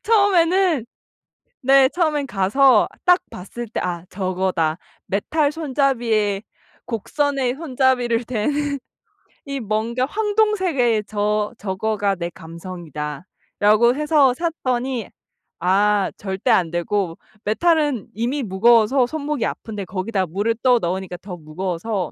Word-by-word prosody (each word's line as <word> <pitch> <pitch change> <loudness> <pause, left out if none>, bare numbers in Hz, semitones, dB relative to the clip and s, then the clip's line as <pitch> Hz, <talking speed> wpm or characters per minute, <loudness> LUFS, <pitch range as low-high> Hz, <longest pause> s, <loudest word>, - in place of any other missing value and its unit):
처음에는 375 - +3 0.8
네. 270 0 +6
처음에는 310 -5 0
가서 215 +4 +4 0.2
딱 360 0 +6
봤을 225 +6 -8
때 220 - -4
'아 175 -2 -3
저거다. 185 -4 -1 0.3
메탈 290 +9 0
손잡이에 245 -9 0 0.4
곡선의 265 +2 -1
손잡이를 255 -5 +1
댄 230 +2 -1 0.9
이 275 -1 -4
뭔가 225 +3 -1
황동색의 380 - +1
저 210 +1 -1
저거가 200 0 -1
내 170 -1 -4
감성이다.'라고 175 - -1
해서 295 -4 +3
샀더니 255 - -2 0.5
아 200 +2 +2
절대 190 +4 -3
안 180 -7 +3
되고 175 0 -1 0.3
메탈은 295 - +1
이미 245 +7 -1
무거워서 230 +4 +4
손목이 290 -2 -2
아픈데 210 -3 -5
거기다 190 +1 -2
물을 205 +7 -1
떠 250 -2 +5
넣으니까 180 -1 -3
더 185 -2 -7
무거워서 175 +4 -3
225 Hz, 250 characters per minute, -21 LUFS, 190-275 Hz, 0.9 s, 네